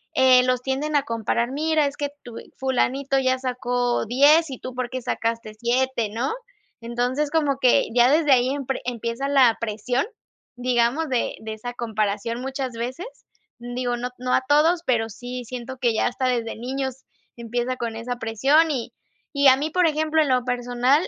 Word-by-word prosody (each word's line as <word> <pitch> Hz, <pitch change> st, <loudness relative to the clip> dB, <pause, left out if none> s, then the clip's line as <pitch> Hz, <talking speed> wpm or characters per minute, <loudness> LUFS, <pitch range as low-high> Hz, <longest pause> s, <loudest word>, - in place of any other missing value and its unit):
eh, 260 Hz, -1 st, +6 dB
los 255 Hz, -1 st, +1 dB
tienden 285 Hz, +3 st, -2 dB
a 280 Hz, -, +3 dB
comparar, 235 Hz, +1 st, -1 dB
mira, 310 Hz, +1 st, +1 dB
es 280 Hz, -, -5 dB
que 285 Hz, -1 st, -2 dB
tu 240 Hz, -2 st, -10 dB, 0.2 s
fulanito 265 Hz, +1 st, 0 dB
ya 260 Hz, 0 st, +1 dB
sacó 245 Hz, -2 st, -1 dB
10, 290 Hz, +6 st, +5 dB
¿y 260 Hz, -, -6 dB
tú 255 Hz, -, -7 dB
por 250 Hz, -1 st, -3 dB
qué 255 Hz, -1 st, -4 dB
sacaste 230 Hz, -2 st, -2 dB
7?, 240 Hz, -1 st, 0 dB
¿no? 235 Hz, -, -2 dB, 0.5 s
Entonces, 245 Hz, +5 st, -1 dB
como 290 Hz, -4 st, +1 dB
que 250 Hz, -2 st, +4 dB
ya 245 Hz, +1 st, +6 dB
desde 300 Hz, -2 st, +3 dB
ahí 255 Hz, 0 st, +4 dB
empre 270 Hz, -1 st, -3 dB
empieza 235 Hz, +2 st, -3 dB
la 260 Hz, -5 st, +5 dB
presión, 230 Hz, +4 st, -1 dB, 0.5 s
digamos, 250 Hz, +5 st, +1 dB
de 250 Hz, -2 st, -1 dB
de 220 Hz, 0 st, -5 dB
esa 245 Hz, +3 st, -7 dB
comparación 225 Hz, +1 st, -2 dB
muchas 265 Hz, -1 st, -3 dB
veces. 250 Hz, -, -5 dB, 0.5 s
Digo, 245 Hz, 0 st, -3 dB
no 245 Hz, +1 st, -3 dB
no 250 Hz, 0 st, -2 dB
a -, -, +4 dB
todos, 325 Hz, +4 st, +4 dB
pero 225 Hz, -3 st, +1 dB
sí 245 Hz, +3 st, -7 dB
siento 255 Hz, +2 st, -7 dB
que 240 Hz, -3 st, +1 dB
ya -, -, +1 dB
hasta 250 Hz, +2 st, -2 dB
desde 235 Hz, -3 st, -1 dB
niños 265 Hz, +2 st, -4 dB, 0.3 s
empieza 240 Hz, +2 st, -3 dB
con 230 Hz, -2 st, -4 dB
esa 245 Hz, +2 st, -4 dB
presión 275 Hz, +9 st, +2 dB
y 250 Hz, -5 st, -3 dB, 0.4 s
y 280 Hz, 0 st, +4 dB
a 260 Hz, -, +5 dB
mí, 300 Hz, +3 st, -2 dB
por 360 Hz, +1 st, +2 dB
ejemplo, 315 Hz, +1 st, +1 dB
en 290 Hz, -, +1 dB
lo 250 Hz, -1 st, +2 dB
personal, 245 Hz, +5 st, +1 dB
250 Hz, 180 wpm, -23 LUFS, 240-275 Hz, 0.5 s, eh